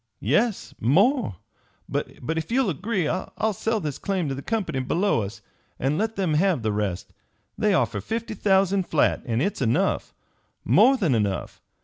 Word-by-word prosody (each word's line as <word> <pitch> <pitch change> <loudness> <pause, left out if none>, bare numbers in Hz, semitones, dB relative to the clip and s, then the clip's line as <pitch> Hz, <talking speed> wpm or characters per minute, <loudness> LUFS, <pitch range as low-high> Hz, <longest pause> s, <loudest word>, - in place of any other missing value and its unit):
"Yes, 195 - 0
more. 200 - +3 0.5
But - - -2 0.3
if 160 0 -3
you'll 250 -5 +2
agree, 185 +1 -1
I'll 210 +5 -2
sell 220 +3 -1
this 150 -6 -4
claim 190 -6 -1
to - - -1
the 135 - -5
company 205 - -2
below 165 - +1
us 100 +1 -7 0.3
and 140 +4 0
let 220 +1 -1
them 185 -5 0
have 165 -5 +2
the 110 - +1
rest. 100 -4 -3 0.4
They 210 -2 +2
offer - - 0
fifty 225 0 -4
thousand 195 -2 +2
flat, 155 - +2
and 120 +3 0
it's 200 - -2
enough 120 -1 0 0.5
more 220 - +5
than 175 - +1
enough. 105 -4 -2
185 Hz, 160 wpm, -25 LUFS, 135-210 Hz, 0.5 s, more